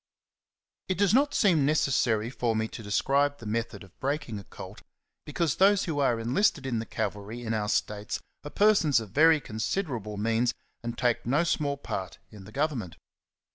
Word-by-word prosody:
T 185 Hz, -, 0 dB
T -, -, -12 dB
does 200 Hz, 0 st, +3 dB
not 285 Hz, +3 st, +3 dB
seem 175 Hz, -9 st, +4 dB
necessary 120 Hz, -6 st, +1 dB
for 120 Hz, -2 st, -1 dB
me 110 Hz, 0 st, 0 dB
to -, -, -8 dB
J -, -, -11 dB
describe 140 Hz, +7 st, +1 dB
the 115 Hz, -, -12 dB
method 115 Hz, +1 st, -3 dB
of 95 Hz, -, -19 dB
breaking 135 Hz, -6 st, -2 dB
a -, -, -10 dB
colt, -, -, -11 dB, 0.5 s
because 150 Hz, -1 st, -1 dB
those 195 Hz, +1 st, +5 dB
who 155 Hz, -4 st, -2 dB
are 120 Hz, -4 st, +2 dB
enlisted 135 Hz, -, +1 dB
in 120 Hz, -4 st, -1 dB
the 115 Hz, -, -5 dB
cavalry 105 Hz, +3 st, -4 dB
'^ 120 Hz, -, -8 dB
in 110 Hz, -, -1 dB
our 105 Hz, -1 st, -1 dB
states 105 Hz, 0 st, -1 dB, 0.2 s
are 145 Hz, -, -6 dB
persons 195 Hz, -, +4 dB
of 110 Hz, -4 st, -8 dB
very 160 Hz, +4 st, +5 dB
considerable 110 Hz, -, -3 dB
means, 115 Hz, +3 st, +1 dB, 0.3 s
and 120 Hz, 0 st, -5 dB
take 120 Hz, -2 st, 0 dB
no 145 Hz, +7 st, +3 dB
small 145 Hz, -4 st, 0 dB
part 95 Hz, -9 st, -5 dB
in 100 Hz, -3 st, -12 dB
the 105 Hz, -, -12 dB
govern 145 Hz, +2 st, 0 dB
ment. 90 Hz, -6 st, -8 dB
125 Hz, 195 wpm, -28 LUFS, 110-155 Hz, 0.5 s, those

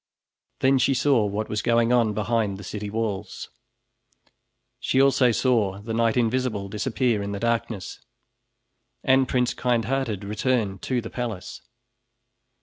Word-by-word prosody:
Then 135 Hz, 0 st, +4 dB
she 135 Hz, +1 st, +2 dB
saw 130 Hz, -6 st, +3 dB
what 105 Hz, +2 st, -3 dB
was 105 Hz, -1 st, -2 dB
going 115 Hz, +1 st, +2 dB
on 115 Hz, -4 st, +2 dB
behind 110 Hz, -2 st, 0 dB
the 100 Hz, -, -10 dB
city 105 Hz, 0 st, -5 dB
walls. 105 Hz, -2 st, -4 dB, 1.3 s
She 130 Hz, -, +1 dB
also 135 Hz, -2 st, +4 dB
saw 110 Hz, -6 st, +1 dB
the 110 Hz, +2 st, -6 dB
Knight 115 Hz, +1 st, +1 dB
Invisible 115 Hz, -4 st, 0 dB
disappear 110 Hz, +1 st, 0 dB
in 100 Hz, 0 st, -4 dB
the 100 Hz, -, -4 dB
darkness, 115 Hz, -3 st, -2 dB, 1.0 s
and 130 Hz, 0 st, +4 dB
Prince 125 Hz, -1 st, +1 dB
Kindhearted 120 Hz, -3 st, -1 dB
return 105 Hz, -1 st, -1 dB
to 125 Hz, +3 st, -1 dB
the -, -, -8 dB
palace. 115 Hz, -7 st, -5 dB
115 Hz, 135 wpm, -24 LUFS, 105-125 Hz, 1.3 s, Then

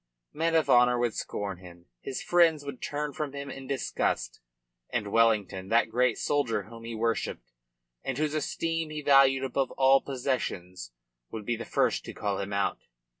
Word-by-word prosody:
Men 165 Hz, +2 st, 0 dB
of 160 Hz, -, +3 dB
honour 125 Hz, 0 st, +5 dB
would 120 Hz, -2 st, 0 dB
scorn 100 Hz, -3 st, -4 dB
him, 85 Hz, -1 st, -14 dB, 0.2 s
his 130 Hz, -, -5 dB
friends 165 Hz, -4 st, +3 dB
would 140 Hz, -3 st, -7 dB
turn 150 Hz, 0 st, -3 dB
from 145 Hz, -1 st, -4 dB
him 140 Hz, -1 st, -6 dB
in 135 Hz, 0 st, -9 dB
disgust, 130 Hz, -, -1 dB, 0.5 s
and 105 Hz, -4 st, -2 dB
Wellington, 105 Hz, -5 st, +2 dB
that 115 Hz, 0 st, +3 dB
great 125 Hz, 0 st, +2 dB
soldier 115 Hz, -8 st, 0 dB
whom 115 Hz, +2 st, -12 dB
he 115 Hz, 0 st, -5 dB
worshipped, 110 Hz, -, -2 dB, 0.5 s
and 130 Hz, -, -3 dB
whose 155 Hz, 0 st, 0 dB
esteem 165 Hz, +1 st, -2 dB
he 155 Hz, -1 st, -5 dB
valued 135 Hz, -1 st, +5 dB
above 135 Hz, 0 st, 0 dB
all 135 Hz, 0 st, +5 dB
possessions, 100 Hz, -, -3 dB, 0.4 s
would 110 Hz, -2 st, -7 dB
be 120 Hz, -, 0 dB
the 115 Hz, -, -6 dB
first -, -, +1 dB
to -, -, -8 dB
cast 100 Hz, -1 st, -2 dB
him 100 Hz, +1 st, -5 dB
out. 100 Hz, -1 st, 0 dB
125 Hz, 175 wpm, -28 LUFS, 105-140 Hz, 0.5 s, honour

